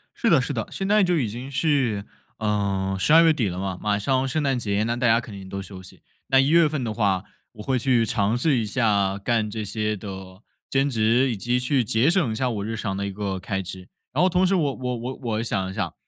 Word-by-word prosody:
是 -, -, +1 dB
的， -, -, +5 dB
是 -, -, -3 dB
的， -, -, -3 dB
现 195 Hz, -1 st, -3 dB
在 210 Hz, 0 st, +4 dB
就 180 Hz, -2 st, +2 dB
已 130 Hz, -7 st, 0 dB
经 120 Hz, +6 st, -7 dB
是， 130 Hz, -8 st, 0 dB, 0.3 s
呃， 100 Hz, -3 st, -1 dB
十 150 Hz, -, +2 dB
二 165 Hz, +1 st, +8 dB
月 165 Hz, -1 st, +5 dB
底 125 Hz, -8 st, 0 dB
了 90 Hz, -1 st, -4 dB
嘛， 95 Hz, -1 st, -3 dB
马 105 Hz, -1 st, +1 dB
上 130 Hz, +5 st, 0 dB
圣 150 Hz, +4 st, -1 dB
诞 135 Hz, -2 st, +1 dB
节 105 Hz, -3 st, 0 dB
那 115 Hz, +1 st, -1 dB
大 120 Hz, +1 st, +1 dB
家 115 Hz, 0 st, +5 dB
肯 115 Hz, -2 st, -9 dB
定 95 Hz, -1 st, -10 dB
都 100 Hz, 0 st, -4 dB
休 95 Hz, -1 st, -10 dB
息， 95 Hz, -, -14 dB, 0.3 s
那 135 Hz, -, +4 dB
一 135 Hz, +2 st, +3 dB
月 165 Hz, -1 st, +5 dB
份 145 Hz, -4 st, -3 dB
的 110 Hz, -2 st, -2 dB
话 100 Hz, -4 st, +1 dB, 0.3 s
我 105 Hz, -2 st, -10 dB
会 130 Hz, +3 st, 0 dB
去 120 Hz, -2 st, +2 dB
尝 105 Hz, +1 st, 0 dB
试 140 Hz, +1 st, +2 dB
一 115 Hz, -, 0 dB
下， 100 Hz, -4 st, +1 dB
干 110 Hz, +1 st, 0 dB
这 110 Hz, 0 st, -4 dB
些 105 Hz, +1 st, -1 dB
的 95 Hz, -1 st, -9 dB, 0.3 s
兼 135 Hz, +1 st, +1 dB
职， 120 Hz, +2 st, +2 dB
以 -, -, -2 dB
及 120 Hz, +5 st, 0 dB
去 125 Hz, +1 st, +1 dB
节 115 Hz, +6 st, +2 dB
省 170 Hz, -, +2 dB
一 -, -, -3 dB
下 130 Hz, +1 st, 0 dB
我 105 Hz, -3 st, -3 dB
日 115 Hz, +1 st, -3 dB
常 100 Hz, -3 st, -3 dB
的 100 Hz, +1 st, -2 dB
一 100 Hz, -, -4 dB
个 95 Hz, -1 st, -3 dB
开 95 Hz, +1 st, -3 dB
支。 90 Hz, 0 st, -8 dB, 0.3 s
然 -, -, +1 dB
后 185 Hz, -, +4 dB
同 180 Hz, +1 st, +2 dB
时 190 Hz, -, +2 dB
我 150 Hz, -6 st, +1 dB
我 125 Hz, -1 st, -3 dB
我 125 Hz, +3 st, -6 dB
我 115 Hz, -2 st, -1 dB
想 95 Hz, -4 st, -2 dB
一 -, -, -8 dB
想， 95 Hz, -4 st, -3 dB
115 Hz, 280 characters per minute, -24 LUFS, 100-135 Hz, 0.3 s, 二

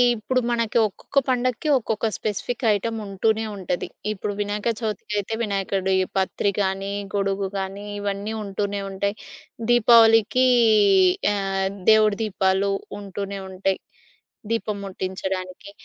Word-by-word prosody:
ఇప్పుడు 255 Hz, +4 st, 0 dB
మనకి 230 Hz, -1 st, 0 dB
ఒక్కొక్క 275 Hz, +7 st, -1 dB
పండక్కి 255 Hz, +2 st, 0 dB
ఒక్కొక్క 220 Hz, -2 st, -2 dB
స్పెసిఫిక్ 220 Hz, +4 st, -3 dB
ఐటమ్ 225 Hz, +3 st, -2 dB
ఉంటూనే 220 Hz, +3 st, 0 dB
ఉంటది. 180 Hz, -3 st, -3 dB, 0.2 s
ఇప్పుడు 205 Hz, 0 st, -3 dB
వినాయక 205 Hz, +2 st, -1 dB
చవితికయితే 210 Hz, -1 st, -3 dB
వినాయకుడి 195 Hz, -2 st, 0 dB, 0.2 s
పత్రి 195 Hz, +1 st, +1 dB
గానీ, 195 Hz, 0 st, -1 dB, 0.2 s
గొడుగు 195 Hz, 0 st, 0 dB
గానీ 195 Hz, +1 st, -5 dB
ఇవన్నీ 205 Hz, +1 st, -3 dB
ఉంటూనే 200 Hz, 0 st, -3 dB
ఉంటాయి. 200 Hz, +1 st, -2 dB, 0.5 s
దీపావళికి 230 Hz, +1 st, +6 dB, 0.9 s
ఆహ్, 195 Hz, -1 st, -1 dB, 0.2 s
దేవుడి 215 Hz, -2 st, +5 dB
దీపాలు 195 Hz, -1 st, +1 dB, 0.3 s
ఉంటూనే 200 Hz, 0 st, -5 dB
ఉంటాయి. 190 Hz, 0 st, -1 dB, 0.7 s
దీపం 220 Hz, -2 st, -1 dB
ముట్టించడానికి. 190 Hz, 0 st, -5 dB
200 Hz, 105 wpm, -23 LUFS, 195-220 Hz, 0.9 s, దీపావళికి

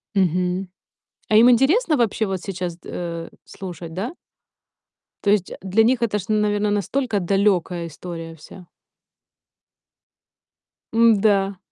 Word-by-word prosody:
Мгм. 180 Hz, 0 st, 0 dB, 0.6 s
А 215 Hz, -, +3 dB
им 235 Hz, +3 st, +7 dB
интересно 305 Hz, -, +3 dB
вообще 225 Hz, -2 st, +1 dB
вот 190 Hz, -2 st, -3 dB
сейчас, 180 Hz, -3 st, -5 dB
э, 170 Hz, -1 st, -5 dB, 0.2 s
слушать, 175 Hz, -3 st, -8 dB
да? 230 Hz, -, -4 dB, 1.1 s
То 200 Hz, -, +1 dB
есть 200 Hz, -3 st, +1 dB
для 195 Hz, +4 st, +2 dB
них 240 Hz, +1 st, +2 dB
это 210 Hz, -3 st, 0 dB
ж, 185 Hz, -, -7 dB
наверное, 210 Hz, -1 st, +1 dB
настолько 210 Hz, +2 st, -1 dB
далёкая 180 Hz, -2 st, +1 dB
история 165 Hz, 0 st, -8 dB
вся. 170 Hz, +3 st, -14 dB, 2.3 s
М-да. 205 Hz, -4 st, +3 dB
195 Hz, 115 wpm, -22 LUFS, 180-220 Hz, 2.3 s, им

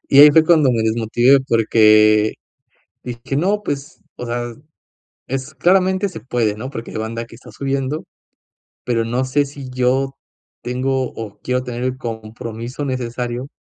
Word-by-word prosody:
Y 140 Hz, -, +5 dB
ahí 150 Hz, +1 st, +10 dB
fue 160 Hz, +2 st, +5 dB
cuando 155 Hz, -5 st, +5 dB
me 115 Hz, -2 st, +1 dB
desmotivé, 115 Hz, +4 st, +3 dB
porque 110 Hz, -2 st, +5 dB, 0.7 s
dije: 125 Hz, +2 st, -5 dB
“No, 200 Hz, +6 st, +1 dB
pues, 140 Hz, -4 st, -5 dB, 0.2 s
o 125 Hz, -, -6 dB
sea, 120 Hz, 0 st, -3 dB, 0.8 s
es 130 Hz, 0 st, -4 dB
claramente, 190 Hz, +2 st, +2 dB
se 175 Hz, -, -9 dB
puede, 115 Hz, -4 st, 0 dB
¿no?, 130 Hz, +5 st, -6 dB
porque 115 Hz, -3 st, -7 dB
hay -, -, -6 dB
banda 115 Hz, +1 st, -4 dB
que 115 Hz, -, -15 dB
está 125 Hz, -, -14 dB
subiendo. 140 Hz, +2 st, -2 dB, 0.8 s
Pero 115 Hz, -2 st, 0 dB
no 125 Hz, +3 st, 0 dB
sé 145 Hz, +3 st, +2 dB
si 140 Hz, -2 st, -9 dB
yo 130 Hz, +2 st, +1 dB, 0.5 s
tengo 130 Hz, +1 st, -1 dB
o 110 Hz, -3 st, -7 dB
quiero 125 Hz, 0 st, -1 dB
tener 125 Hz, -1 st, -5 dB
el 130 Hz, 0 st, -1 dB
compromiso 115 Hz, +3 st, -6 dB
necesario 125 Hz, 0 st, -3 dB
125 Hz, 155 wpm, -19 LUFS, 115-135 Hz, 0.8 s, ahí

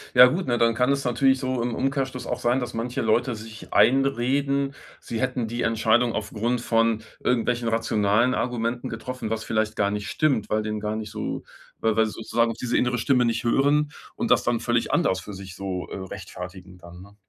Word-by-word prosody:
Ja 125 Hz, 0 st, +11 dB
gut, 150 Hz, +6 st, 0 dB
ne, 120 Hz, -1 st, +1 dB
dann 115 Hz, -1 st, +3 dB
kann 125 Hz, +3 st, +2 dB
es 140 Hz, 0 st, 0 dB
natürlich 130 Hz, +2 st, +3 dB
so 130 Hz, -2 st, -1 dB
im 120 Hz, -1 st, -2 dB
Umkehrschluss 135 Hz, -1 st, -2 dB
auch -, -, -3 dB
sein, 120 Hz, +2 st, +2 dB
dass 120 Hz, -1 st, -4 dB
manche 120 Hz, +2 st, -2 dB
Leute 115 Hz, +2 st, +1 dB
sich 110 Hz, 0 st, -10 dB
einreden, 140 Hz, +1 st, +2 dB, 0.3 s
sie 115 Hz, 0 st, -5 dB
hätten 125 Hz, -3 st, -1 dB
die 120 Hz, +2 st, -3 dB
Entscheidung 115 Hz, +1 st, +2 dB
aufgrund 115 Hz, +3 st, -2 dB
von 115 Hz, -2 st, +1 dB, 0.2 s
irgendwelchen 120 Hz, -1 st, +1 dB
rationalen 115 Hz, +1 st, +2 dB
Argumenten 120 Hz, 0 st, -2 dB
getroffen, 115 Hz, +1 st, -5 dB
was 110 Hz, 0 st, -2 dB
vielleicht 110 Hz, -1 st, -1 dB
gar 100 Hz, 0 st, +1 dB
nicht 105 Hz, 0 st, -3 dB
stimmt, 135 Hz, -9 st, +1 dB
weil 110 Hz, 0 st, +1 dB
denen 105 Hz, 0 st, -3 dB
gar 105 Hz, +1 st, -2 dB
nicht 110 Hz, -1 st, -5 dB
so, -, -, -4 dB, 0.4 s
weil 110 Hz, -1 st, +1 dB
weil 110 Hz, 0 st, +3 dB
sozusagen 115 Hz, +2 st, 0 dB
auf 115 Hz, -, -5 dB
diese 125 Hz, 0 st, -2 dB
innere 125 Hz, 0 st, +2 dB
Stimme 125 Hz, +1 st, +3 dB
nicht 115 Hz, -1 st, 0 dB
hören 145 Hz, +5 st, +2 dB, 0.2 s
und -, -, -1 dB
das -, -, +5 dB
dann 120 Hz, -1 st, +1 dB
völlig 120 Hz, -1 st, 0 dB
anders 95 Hz, -, +2 dB
für 100 Hz, +4 st, -9 dB
sich 95 Hz, -2 st, -9 dB
so, 95 Hz, -2 st, -4 dB
äh, -, -, -6 dB
rechtfertigen 90 Hz, -1 st, -9 dB
dann, 85 Hz, +1 st, -12 dB
ne? 100 Hz, +1 st, -17 dB
115 Hz, 200 wpm, -25 LUFS, 110-125 Hz, 0.4 s, Ja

